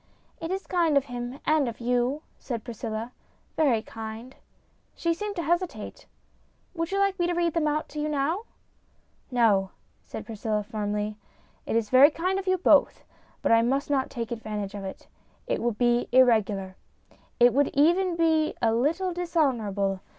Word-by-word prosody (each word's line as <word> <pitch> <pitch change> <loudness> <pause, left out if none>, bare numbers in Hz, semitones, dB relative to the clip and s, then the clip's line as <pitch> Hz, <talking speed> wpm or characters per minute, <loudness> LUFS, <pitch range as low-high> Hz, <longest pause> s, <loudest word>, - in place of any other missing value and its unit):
" - - -36
It 325 - -4
is 385 +1 -3
kind 335 -5 +2
of 275 - +2
him 245 +1 -6
and 305 -5 +2
of 230 - -9
you," 245 +5 0 0.2
said 235 -5 -5
Priscilla, 230 0 -5 0.2
" - - -39
very 255 -8 +2
kind." 225 +3 -8 0.6
She 335 0 0
seemed 415 +4 -5
to 340 - -2
hesitate. 345 +2 -2 0.7
"Would 330 -1 -2
you 395 - 0
like 395 -1 +1
me 350 - +2
to 350 - 0
read 340 -2 +1
them 325 -2 +1
out 300 +1 -1
to 300 - -6
you 300 +1 -1
now? 305 +9 -1 0.4
" - - -39
"No," 200 -5 +4 0.3
said - - -8
Priscilla, 215 -1 -2
firmly. 210 0 -3 0.5
"It - - -1
is 225 -2 0
very 265 +3 +8
kind 365 +5 -1
of 390 - -7
you 370 0 +3
both, 360 - +3 0.4
but - - +2
I 230 0 +6
must 270 +5 0
not 265 -2 +1
take 235 -2 -5
advantage 215 -3 -4
of 200 -1 -6
it. 190 - -8 0.4
It - - -1
would 235 -3 -1
be 240 0 +2
irregular. 215 -7 +3 0.6
It 245 -1 +6
would 285 +2 +3
even 345 +5 +3
be 320 -2 +2
a 225 -2 +2
little 330 +10 0
dis 350 -1 -4
honourable. 205 - +1
260 Hz, 180 wpm, -26 LUFS, 225-330 Hz, 0.7 s, very